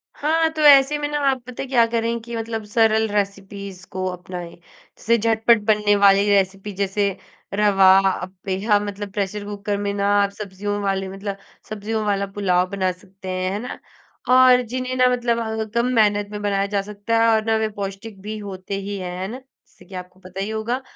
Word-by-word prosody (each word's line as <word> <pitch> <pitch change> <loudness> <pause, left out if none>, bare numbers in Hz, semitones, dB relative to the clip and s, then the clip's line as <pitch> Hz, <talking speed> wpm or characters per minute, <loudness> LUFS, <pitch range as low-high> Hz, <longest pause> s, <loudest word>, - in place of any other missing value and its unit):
हाँ, 320 +2 +1
तो 315 -1 -5
ऐसे 285 0 +7
में 295 0 -2
ना, 295 0 -2
आप 265 -2 -1
पता 250 - -6
है - - -7
क्या 240 -3 +4
करें 230 0 0
कि 235 +1 -7
मतलब 225 -1 -4
सरल 220 0 +2
रेसिपीज़ 200 -2 -4
को 185 0 -3
अपनाएँ। 180 -1 -7
जैसे 220 +6 -3
झटपट 225 0 +3
बनने 210 -1 +3
वाली 200 0 +5
रेसिपी 195 0 +1
जैसे 200 +1 0 0.5
रवा 195 -2 +4 0.2
अप्पे, 185 +1 -4
हाँ, 210 -2 +4
मतलब 205 0 -6
प्रेशर 205 0 -3
कुकर 205 0 -3
में 200 0 -2
ना, 200 0 0
आप 200 - +2
सब्ज़ियों 205 0 -4
वाले 195 -1 -1
मतलब 195 +1 -5 0.3
सब्ज़ियों 215 +1 -3
वाला 200 -1 0
पुलाव 185 -3 +1
बना 190 -1 0
सकते 190 +1 -12
हैं, 185 0 -1
है 205 - -2
ना? - - -7 0.5
और 255 -1 +7
जिन्हें 255 +2 -4
ना, 255 0 +5
मतलब 230 -2 -2
कम 235 0 +2
मेहनत 205 -2 +3
में 210 - -5
बनाया 200 -1 0
जा 200 -1 0
सकता 210 +3 -2
है - - +4
और 220 - +1
ना, 225 0 +2
वे 220 0 0
पौष्टिक 195 +1 -6
भी 215 +2 -5
होते 195 -1 -6
ही 200 +1 -5
हैं। 180 -1 -5
है 190 - -2
ना? 240 +5 -6
जैसे 265 0 -24
कि 195 - -11
आपको 180 0 -9
पता 185 0 -10
ही 200 - -3
होगा। 220 +4 -2
205 Hz, 200 wpm, -22 LUFS, 195-225 Hz, 0.5 s, ऐसे